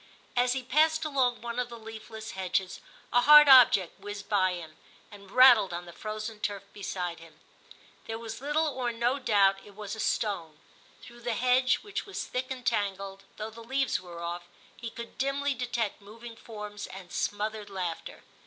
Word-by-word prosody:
As 245 0 +3
he 260 -1 -3
passed 315 +5 +2
along 260 -5 0
one 235 +1 -4
of 245 -1 -2
the 235 - -8
leafless 220 0 -9
hedges 190 0 -2 0.3
a 245 - +5
hard 300 +2 +9
object 245 -9 +7
whizzed 205 -1 -7
by 185 -3 +2
him, 160 -3 -8 0.4
and 200 -1 -13
rattled 240 -6 +7
on 175 +1 -5
the 170 - -11
frozen 215 +2 -6
turf 205 -2 -3
beside 180 -4 -4
him; 165 -1 -16 0.7
there 225 - -3
was 230 +1 -7
little 295 +3 +1
or 255 -4 -2
no 240 +4 0
doubt 200 -6 +4
it 205 - -15
was 210 0 -6
a - - -10
stone. 175 -9 -1 0.5
Through 240 0 -13
the 235 -1 -2
hedge, 255 +1 +3
which 420 +1 -5
was 395 - -4
thick 255 +1 -3
and 255 -2 -6
tangled, 195 -3 -2
though 215 +1 -5
the 230 +1 -11
leaves 265 -1 0
were 170 -2 -9
off, 175 +1 -5 0.3
he 235 - -6
could 235 +1 -10
dimly 275 +1 0
detect 240 -4 -3
moving 230 +3 -11
forms 210 -2 -8
and 185 -2 -11
smothered 210 0 -2
laughter. 180 -4 -5
220 Hz, 180 wpm, -29 LUFS, 195-250 Hz, 0.7 s, hard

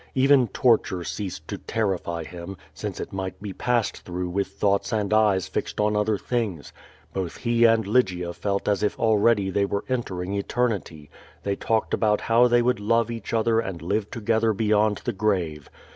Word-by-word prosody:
Even 135 -1 +5
torture 110 -6 +2
ceased 100 +1 -5
to - - -5
terrify 95 -6 -2
him, 90 +3 -8 0.2
since - - -5
it - - -6
might 95 -1 -4
be 100 -1 -6
passed 120 +1 0
through 90 0 -5
with 100 +2 -1
thoughts 100 +1 0
and 105 -2 0
eyes 105 -4 +3
fixed - - -4
on 105 0 +2
other 105 0 +1
things. 105 -10 -3 0.4
Both 95 -3 -3
he 120 -1 +2
and 115 -1 +4
Lygia 95 -6 +1
felt 100 +3 -2
as 105 -1 +1
if 105 - -1
already 110 -2 +3
they 100 +1 +1
were 100 0 -3
entering 100 -7 -3
eternity; 100 -8 -2 0.3
they 100 -1 -1
talked 110 +2 -1
about 105 -1 +2
how 115 +2 +4
they 120 0 +3
would 125 -3 +1
love 115 +2 +1
each 115 -3 -6
other 115 0 +2
and 95 -6 -4
live 100 +5 -2
together 115 -1 +1
beyond 105 0 +2
the 120 - -1
grave. 90 -8 -1
105 Hz, 175 wpm, -25 LUFS, 95-115 Hz, 0.4 s, Even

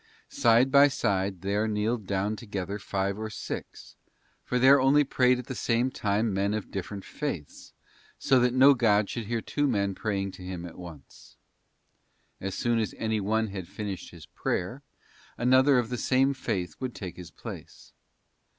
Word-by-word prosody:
Side 120 +3 +3
by 140 +1 +7
side 95 -8 -1
there 100 +3 0
kneeled 105 0 -1
down 100 +2 -1
together 100 -2 -5
five 100 0 -2
or 110 0 -4
six, 105 - -7 0.5
for 125 - -1
there 130 +2 +6
only 140 +3 +5
prayed 125 -2 +3
at 125 - -6
the 130 - -5
same 120 +1 0
time 105 -1 0
men 100 +2 0
of 110 - -5
different 100 +1 -5
faiths, 115 - -6 0.5
so 130 -1 +3
that 125 0 +2
no 135 +2 +7
god 105 -5 +2
should 115 -3 -4
hear 115 0 -1
two 145 +6 -1
men 100 -6 0
praying 100 -1 -2
to 95 - -12
him 90 -1 -6
at 85 0 -10
once. 85 -6 -13 1.0
As 95 0 -4
soon 120 -1 +1
as 110 - -2
any 110 -1 -1
one 110 +2 0
had 95 -3 -6
finished 100 -1 -6
his 85 -3 -13
prayer, - - -3 0.6
another 130 +3 +4
of 120 -2 0
the 125 -1 -3
same 135 +1 +2
faith 90 - -3
would 130 -2 -4
take 90 -4 -7
his 90 -2 -10
place. - - -11
110 Hz, 170 wpm, -28 LUFS, 95-125 Hz, 1.0 s, by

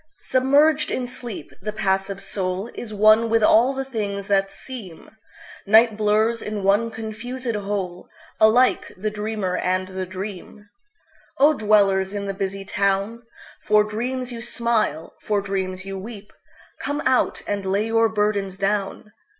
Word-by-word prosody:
Submerged 285 +4 +3
in 255 - -2
sleep, 245 -3 -8
the 210 +2 -3
passive 195 -1 -1
soulIs 195 +4 -4
one 215 +2 +5
with 225 -1 +3
all 235 +5 +5
the 270 0 -4
things 205 -6 -4
that 195 -1 +2
seem; 210 -12 -10 0.6
Night 220 +1 +6
blurs 215 +2 +1
in 210 -2 -4
one 205 +4 +3
confusèd 225 +3 -5 0.9
wholeAlike 235 +4 +4
the 215 +2 -2
dreamer 210 -3 -2
and 185 +1 -1
the 185 -1 -5
dream.O 210 - -3
dwellers 200 -4 +2
in 200 0 -3
the 195 - -3
busy 195 0 -4
town! 200 +4 0 0.5
For 210 0 +5
dreams 245 +4 -3
you 230 - -6
smile, 235 -9 -1
for 210 -1 0
dreams 190 -1 -3
you 195 0 -5
weep. 205 0 -10 0.5
Come 290 +1 -3
out, 260 -1 +1
and 205 -1 -2
lay 195 +3 0
your 225 0 +3
burdens 205 -3 -1
down! 200 +1 -2
210 Hz, 135 wpm, -23 LUFS, 195-230 Hz, 0.9 s, Night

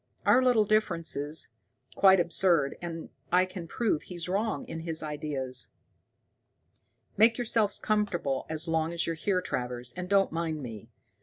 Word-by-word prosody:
"Our 255 - +6
little 240 -4 +4
differences 165 -8 0 0.4
quite 190 -1 +6
absurd, 170 -4 +2
and 165 -2 -6 0.2
I 180 +1 +5
can 185 -2 -8
prove 205 -3 0
he's 175 -2 -7
wrong 205 +5 -1
in 165 - -5
his 160 -1 -3
ideas. 140 -5 -3 1.5
"Make 225 +2 +5
yourself 225 -4 +1
comfortable 180 -11 0
as 160 +2 -2
long 165 0 0
as 170 - 0
you're 165 - -1
here, 180 +3 0
Travers, 125 -3 -3
and 180 0 -6
don't 195 -1 +3
mind 160 -2 -3
me. 110 -5 -8
170 Hz, 145 wpm, -29 LUFS, 155-195 Hz, 1.5 s, Our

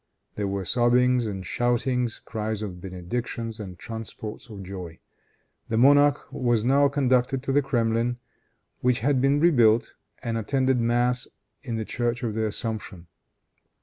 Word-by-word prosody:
There 105 -1 -2
were 100 -1 -3
sobbings 125 +2 +3
and 95 -3 -5
shoutings, 120 0 0
cries 110 -1 -3
of 90 -4 -6
benedictions 110 +5 -4
and 95 -4 -7
transports 110 +1 -7
of 100 -3 -8
joy. 90 -3 -7 0.7
The 110 - 0
monarch 145 +3 +5
was 120 -5 +1
now 140 +2 +5
conducted 130 -2 +1
to 135 - -1
the 145 +2 +4
Kremlin, 120 -2 0 0.6
which 125 -3 +1
had 135 +1 +2
been 140 +2 +3
rebuilt, 120 -9 +4 0.3
and 115 -1 -1
attended 130 +3 +1
mass 120 +1 +1 0.3
in 120 -4 -4
the 110 -1 -3
church 120 +2 -2
of 115 -3 -1
the 110 0 0
Assumption. 105 -5 -5
120 Hz, 145 wpm, -25 LUFS, 110-125 Hz, 0.7 s, monarch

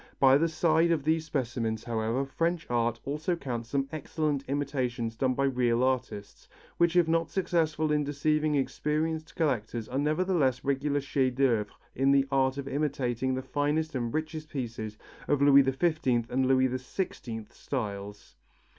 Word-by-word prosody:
By 135 -1 +6
the 165 - +3
side 160 +1 +2
of 165 -4 +1
these 160 +1 +1
specimens, 115 -6 -2
however, 115 +3 -1
French 165 +5 -1
art 115 -1 +1
also 150 +5 -1
counts 120 -7 -5
some 135 0 0
excellent 150 -2 -2
imitations 130 -5 -2
done 130 +2 0
by 140 - 0
real 125 -3 +2
artists, 130 -6 -3 0.3
which 170 0 +3
if 175 -2 +5
not 165 0 +1
successful 160 -4 0
in 150 0 +2
deceiving 150 +1 +1
experienced 155 +4 -1
collectors 115 -7 -1
are 130 - -2
nevertheless 150 -3 +1
regular 140 +1 0
chefs 130 -2 0
d'œuvre 120 -6 +2 0.3
in 135 +1 +2
the 140 -1 +4
art 135 0 +2
of 140 -1 -5
imitating 130 -3 -1
the 130 - -4
finest 150 +3 -1
and 120 -3 -2
richest 155 +1 -4
pieces 115 -6 -5 0.3
of 145 - +3
the 140 - +3
Louis 140 -1 +8
XV 135 -3 +1
and 130 +1 +1
Louis 130 0 +4
XVI 125 - -5
styles. 105 -5 -5
135 Hz, 155 wpm, -29 LUFS, 125-155 Hz, 0.3 s, Louis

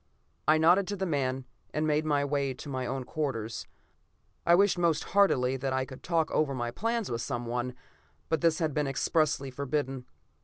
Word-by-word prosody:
I 155 +1 +6
nodded 175 +4 +5
to 205 - -2
the 190 -1 -2
man, 135 -5 -1 0.3
and 155 +1 +1
made 155 0 +1
my 145 -2 +2
way 140 -2 -1
to 130 - -9
my 130 -2 -3
own 135 +1 -2
quarters. 120 -6 -3 0.8
I 170 - +7
wished 195 -1 +3
most 170 -3 +2
heartily 135 -10 +3
that 135 0 -2
I 130 0 0
could 130 -1 -11
talk 165 -2 0
over 145 -3 +1
my 120 -1 -2
plans 230 - -1
with 115 0 -2
someone, 120 0 -3 0.5
but 160 -3 0
this 165 -1 +3
had 160 -3 0
been 150 0 0
expressly 140 0 +1
forbidden. 135 -1 -2
140 Hz, 185 wpm, -29 LUFS, 130-160 Hz, 0.8 s, I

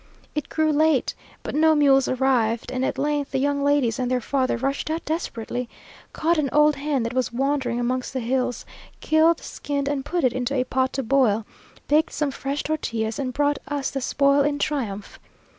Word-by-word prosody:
It 300 - -3
grew 315 -1 +1
late, 305 -2 +2 0.3
but - - -5
no 315 +1 +4
mules 275 -3 +4
arrived; 245 -3 +1
and 255 0 -2
at - - -1
length 290 -1 -1
the - - -2
young 280 +1 0
ladies 280 -6 +2
and 250 -1 -1
their 255 0 +1
father 260 +1 0
rushed 275 +5 -2
out 320 +1 -3
desperately, 250 -6 -3 0.4
caught 330 +1 +1
an 280 -3 0
old 300 -1 +4
hen 280 -3 -1
that 230 +1 -3
was 255 -1 0
wandering 260 -1 0
amongst 250 +1 -1
the 265 - -3
hills, 250 +1 -1 0.3
killed, 320 +1 +3
skinned, 280 -1 -4
and 285 -2 -1
put 345 +3 -2
it 255 - +3
into 255 +2 -2
a 255 - +2
pot 260 0 0
to 270 - -2
boil, 230 -4 +2 0.4
baked 305 +2 +2
some 295 -2 -1
fresh 275 +1 -3
tortillas, 230 -7 -2
and 255 -2 -2
brought 290 +2 +1
us 285 -1 -2
the 270 - -3
spoil 280 +2 +3
in 285 0 +1
triumph! 235 -10 -3
275 Hz, 190 wpm, -24 LUFS, 250-290 Hz, 0.4 s, no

